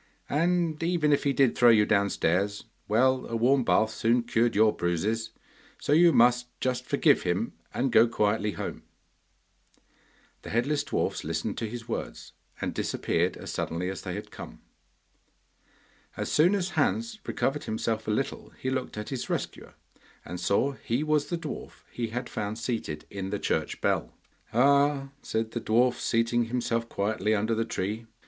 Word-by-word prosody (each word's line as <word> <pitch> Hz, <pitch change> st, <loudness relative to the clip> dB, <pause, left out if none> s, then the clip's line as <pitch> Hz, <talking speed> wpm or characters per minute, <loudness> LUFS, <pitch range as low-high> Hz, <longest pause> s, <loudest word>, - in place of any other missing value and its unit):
And 165 Hz, 0 st, +1 dB
even 165 Hz, -3 st, +2 dB
if 145 Hz, -, +1 dB
he 140 Hz, -, +3 dB
did 135 Hz, -2 st, +3 dB
throw 120 Hz, -1 st, +6 dB
you 110 Hz, -2 st, +6 dB
downstairs, 100 Hz, -1 st, +1 dB, 0.2 s
well, 130 Hz, +4 st, +2 dB
a 115 Hz, -, -4 dB
warm 130 Hz, +3 st, +3 dB
bath 110 Hz, -1 st, +3 dB
soon 115 Hz, +2 st, +1 dB
cured 115 Hz, 0 st, +1 dB
your 110 Hz, +1 st, +4 dB
bruises, 105 Hz, +6 st, -1 dB, 0.5 s
so 145 Hz, -, 0 dB
you 170 Hz, +2 st, +6 dB
must 125 Hz, -1 st, +4 dB
just 125 Hz, -1 st, -1 dB
forgive -, -, +3 dB
him -, -, -1 dB, 0.2 s
and 135 Hz, -, -1 dB
go 115 Hz, +1 st, +6 dB
quietly 105 Hz, -2 st, 0 dB
home.' -, -, -5 dB, 1.6 s
The -, -, -9 dB
headless 140 Hz, +6 st, +1 dB
dwarfs -, -, -2 dB
listened 80 Hz, +6 st, -3 dB
to 115 Hz, -, -3 dB
his 115 Hz, 0 st, -7 dB
words -, -, -5 dB, 0.3 s
and -, -, -2 dB
disappeared -, -, -1 dB
as -, -, -7 dB
suddenly 90 Hz, +3 st, -2 dB
as 95 Hz, -, -7 dB
they -, -, -5 dB
had -, -, -7 dB
come. -, -, -10 dB, 1.6 s
As -, -, -3 dB
soon 175 Hz, +6 st, +4 dB
as 190 Hz, -2 st, -1 dB
Hans 230 Hz, -1 st, 0 dB
recovered 145 Hz, +2 st, -1 dB
himself 110 Hz, 0 st, -2 dB
a -, -, -1 dB
little 110 Hz, +6 st, -2 dB
he 130 Hz, -, -3 dB
looked 130 Hz, -4 st, -3 dB
at 105 Hz, -, -5 dB
his 130 Hz, -3 st, -4 dB
rescuer, -, -, -4 dB, 0.5 s
and 90 Hz, -, -6 dB
saw 100 Hz, +9 st, +2 dB
he 120 Hz, +6 st, 0 dB
was 155 Hz, -1 st, +1 dB
the 175 Hz, -, -2 dB
dwarf 160 Hz, -3 st, -8 dB
he 120 Hz, -1 st, -3 dB
had 120 Hz, +3 st, -4 dB
found 105 Hz, +1 st, -4 dB
seated 115 Hz, -10 st, -3 dB
in 95 Hz, -1 st, -4 dB
the 105 Hz, -, -1 dB
church -, -, -2 dB
bell. -, -, 0 dB, 0.4 s
'Ah!' 140 Hz, +2 st, +3 dB
said 110 Hz, 0 st, -2 dB
the 120 Hz, -, -3 dB
dwarf, 120 Hz, +3 st, +2 dB
seating 115 Hz, +1 st, +1 dB
himself 115 Hz, -1 st, -1 dB
quietly 105 Hz, +1 st, 0 dB
under 110 Hz, +2 st, 0 dB
the 115 Hz, 0 st, 0 dB
tree. 110 Hz, +1 st, -3 dB
115 Hz, 165 wpm, -28 LUFS, 110-135 Hz, 1.6 s, throw